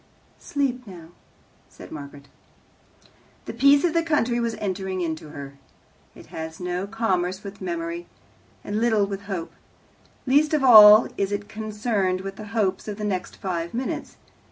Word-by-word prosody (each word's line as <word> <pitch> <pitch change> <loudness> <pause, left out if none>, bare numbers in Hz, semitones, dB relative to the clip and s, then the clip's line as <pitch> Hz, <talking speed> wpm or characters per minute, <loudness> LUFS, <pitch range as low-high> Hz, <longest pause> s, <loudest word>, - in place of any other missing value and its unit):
"Sleep 255 -4 -2
now," 170 -4 -11 0.6
said - - -13
Margaret. 140 -1 -10 1.2
The - - -6
peace 280 +4 +5
of 345 -3 +1
the 335 - +3
country 275 -7 +1
was 235 -1 -1
entering 190 -1 -3
into 160 -2 -4
her. 140 -1 -10 0.6
It - - -13
has 160 0 -6
no 180 +1 -3
commerce 190 -4 -1
with 200 0 -9
memory, 170 -1 -4 0.6
and 210 +2 -3
little 220 -3 +3
with 200 0 -5
hope. 190 -5 -5 0.7
Least 295 +4 +3
of 290 - 0
all 215 -3 +9
is 200 0 -1
it 205 0 -3
concerned 210 -3 -2
with 195 0 -7
the 215 - -8
hopes 210 -4 -1
of 205 -1 -5
the 215 - -6
next 190 -3 -3
five 170 -1 -4
minutes. 255 +2 -4
200 Hz, 155 wpm, -24 LUFS, 180-230 Hz, 1.2 s, all